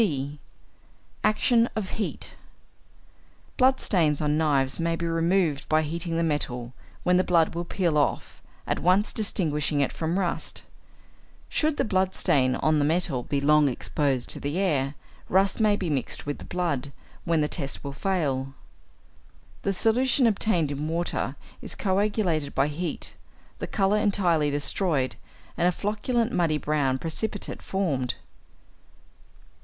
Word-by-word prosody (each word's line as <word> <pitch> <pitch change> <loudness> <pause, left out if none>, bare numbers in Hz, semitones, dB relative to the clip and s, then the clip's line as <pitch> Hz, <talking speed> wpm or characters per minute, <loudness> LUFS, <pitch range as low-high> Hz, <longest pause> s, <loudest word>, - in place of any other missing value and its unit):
(d) 145 -7 -1 0.8
=Action 230 +2 +3
of 210 -4 -3
Heat.= 220 - -3 1.2
Blood 260 +1 +4
stains 155 -7 +2
on 150 -1 +1
knives 140 -4 +1
may 165 0 +1
be 170 - -3
removed 165 -2 +1
by 155 0 +3
heating 165 +2 -2
the 170 - +1
metal, 125 -6 -2 0.3
when 180 0 +4
the 185 - +3
blood 170 -3 +3
will 170 +1 -3
peel 170 -4 +1
off, 145 - -1 0.2
at - - -1
once 185 +4 +2
distinguishing 155 -8 0
it 140 - +1
from 165 +2 -1
rust. 180 -3 -2 0.9
Should 305 -1 +1
the - - +1
blood 190 -2 +1
stain 130 -2 +3
on 155 -1 +2
the - - +2
metal 155 -4 +1
be 140 +3 -1
long 150 0 +4
exposed 135 0 -1
to - - -5
the 145 +4 -3
air, 145 -7 +1 0.3
rust 195 +3 +2
may 215 -2 +4
be 190 -3 -3
mixed 140 -6 -2
with 145 0 -4
the - - -9
blood, 145 -7 -2 0.3
when 165 -2 +1
the 150 - +2
test 140 -4 -4
will 140 -1 -5
fail. 140 -6 -1 1.1
The 200 - 0
solution 245 +6 +3
obtained 195 -8 +2
in 145 +2 -3
water 170 +2 -2 0.3
is - - -6
coagulated 190 -6 0
by 135 +2 +2
heat, 170 +4 -2 0.5
the - - -4
colour 200 0 +2
entirely 180 -8 +2
destroyed, 145 -1 0 0.4
and 175 - +2
a - - +4
flocculent 220 +5 -1
muddy 165 -8 +1
brown 145 -3 0
precipitate 190 +8 -3
formed. 145 -10 -1
165 Hz, 145 wpm, -26 LUFS, 145-195 Hz, 1.2 s, Blood